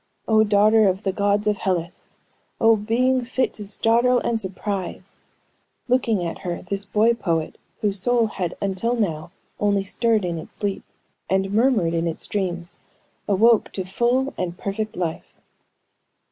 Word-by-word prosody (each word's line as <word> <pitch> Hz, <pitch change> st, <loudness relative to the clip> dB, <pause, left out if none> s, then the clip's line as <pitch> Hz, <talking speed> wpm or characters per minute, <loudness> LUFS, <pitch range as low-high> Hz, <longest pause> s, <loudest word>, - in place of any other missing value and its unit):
Oh, 220 Hz, -1 st, +5 dB
daughter 215 Hz, +1 st, +4 dB
of 190 Hz, +2 st, 0 dB
the 195 Hz, -, 0 dB
gods 205 Hz, +1 st, +1 dB
of 210 Hz, -1 st, +1 dB
Hellas! 175 Hz, -2 st, -3 dB, 0.5 s
Oh, 225 Hz, 0 st, +5 dB
"being 245 Hz, +4 st, +1 dB
fit 255 Hz, +1 st, -1 dB
to 210 Hz, -2 st, -7 dB
startle 235 Hz, +4 st, +3 dB
and 225 Hz, -1 st, -1 dB
surprise," 190 Hz, -1 st, -4 dB, 0.7 s
looking 230 Hz, -7 st, +1 dB
at 165 Hz, -, -4 dB
her, 175 Hz, -1 st, -4 dB
this 195 Hz, +2 st, -3 dB
boy 215 Hz, +4 st, +3 dB
poet, 165 Hz, -8 st, -2 dB, 0.2 s
whose 205 Hz, -2 st, 0 dB
soul 245 Hz, +2 st, +2 dB
had 185 Hz, -5 st, -4 dB
until 200 Hz, +5 st, -1 dB
now 165 Hz, -9 st, -2 dB, 0.3 s
only 200 Hz, -1 st, +2 dB
stirred 220 Hz, 0 st, +1 dB
in 170 Hz, -2 st, -2 dB
its -, -, -11 dB
sleep, 200 Hz, -2 st, -3 dB, 0.5 s
and 190 Hz, +1 st, 0 dB
murmured 220 Hz, -7 st, +3 dB
in 165 Hz, 0 st, 0 dB
its 165 Hz, -, -5 dB
dreams, 175 Hz, -4 st, -3 dB, 0.5 s
awoke 220 Hz, +3 st, +4 dB
to 190 Hz, -, -4 dB
full 245 Hz, +7 st, 0 dB
and 180 Hz, -1 st, -3 dB
perfect 215 Hz, +2 st, -4 dB
life. 170 Hz, -3 st, -4 dB
205 Hz, 150 wpm, -23 LUFS, 185-225 Hz, 0.7 s, Oh